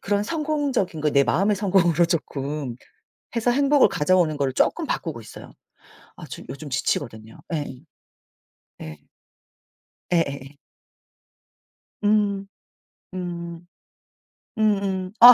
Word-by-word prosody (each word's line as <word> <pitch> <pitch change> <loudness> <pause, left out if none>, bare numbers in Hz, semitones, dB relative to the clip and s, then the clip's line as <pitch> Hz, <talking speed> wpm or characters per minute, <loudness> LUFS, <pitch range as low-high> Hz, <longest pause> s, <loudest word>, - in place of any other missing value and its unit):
그런 200 0 +1
성공적인 285 - -1
거 150 0 +2
내 140 -1 +5
마음의 190 - +2
성공으로 180 -4 +3
쪼끔 145 -6 -3 0.6
해서 230 +1 +2
행복을 280 +1 +5
가져오는 175 -2 +2
거로 140 -2 +1
쪼끔 - - +1
바꾸고 - - -3
있어요. - - -11 0.7
아 - - -9
저 - - -7
요즘 145 +1 -7
지치거든요. 115 -4 -2
예. 145 -5 -3 1.0
예. 75 -1 -8 1.1
예예예. 140 -4 0 1.5
음. 205 -1 +2 0.7
음. 170 -2 -5 0.9
음음. 195 -3 +1
아 245 +1 +12
175 Hz, 215 characters per minute, -24 LUFS, 145-205 Hz, 1.5 s, 아